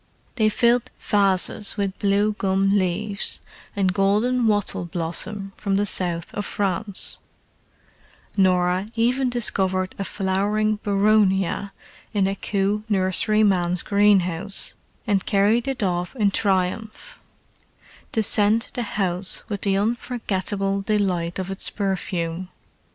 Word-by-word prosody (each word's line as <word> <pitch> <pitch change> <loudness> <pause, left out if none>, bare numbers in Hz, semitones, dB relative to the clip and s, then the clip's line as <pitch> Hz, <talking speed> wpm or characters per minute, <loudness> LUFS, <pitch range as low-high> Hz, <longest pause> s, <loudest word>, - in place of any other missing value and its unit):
They 215 -3 +3
filled 240 +3 +2
vases 200 +1 +1
with 200 -2 -2
blue 205 +1 +2
gum 195 -1 +1
leaves 200 +3 -1 0.4
and 190 -2 +1
golden 215 +6 +2
wattle 205 -4 +1
blossom 180 +4 0
from 200 -2 -1
the 205 +1 +1
South 175 -4 +1
of 205 - -3
France: 200 0 -1 1.2
Norah 185 0 +2
even 250 +3 +1
discovered 190 -6 0
a - - -1
flowering 205 +3 0
boronia 200 -1 +2 0.4
in 200 -2 +3
a 195 - 0
Kew 200 +1 -1
nurseryman's 190 -2 +2
greenhouse 200 -2 +1 0.3
and 200 -4 +1
carried 215 +5 +2
it 265 -5 -2
off 180 +3 -2
in 210 -5 +2
triumph, 195 +2 -1 0.9
to 220 - +1
scent 210 +3 +3
the 245 - -3 0.2
house 185 -1 -1
with 205 -2 -4
the 195 -1 +1
unforgettable 200 -3 -2
delight 190 -5 -1
of 190 0 -4
its 195 - -4
perfume. 185 -3 -3
200 Hz, 115 wpm, -23 LUFS, 185-215 Hz, 1.2 s, They